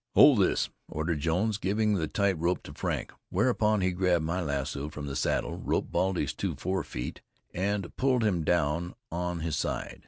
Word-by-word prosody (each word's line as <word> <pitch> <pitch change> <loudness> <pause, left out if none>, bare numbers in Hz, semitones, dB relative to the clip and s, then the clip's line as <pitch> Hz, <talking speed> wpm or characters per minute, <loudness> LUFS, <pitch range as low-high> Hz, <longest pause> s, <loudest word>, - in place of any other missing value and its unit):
"Hold 140 -7 +8
this," 95 - +3 0.2
ordered 80 0 -1
Jones, 95 +8 +1
giving 105 +2 +1
the 80 -5 0
tight 100 +5 +1
rope 85 +2 0
to - - -9
Frank. - - -2 0.2
Whereupon 110 -5 +2
he 90 0 +2
grabbed 90 -3 +2
my 90 +3 -1
lasso 70 -1 -2
from 75 -1 -6
the 70 -1 -4
saddle, - - 0
roped - - -1
Baldy's 95 -1 +1
two - - -2
forefeet, 90 -9 -3 0.3
and 100 0 -1
pulled 130 -2 +2
him 90 -6 +1
down 85 +1 +1 0.2
on 90 0 -2
his 80 -2 -1
side. - - -3
90 Hz, 175 wpm, -29 LUFS, 80-100 Hz, 0.3 s, Hold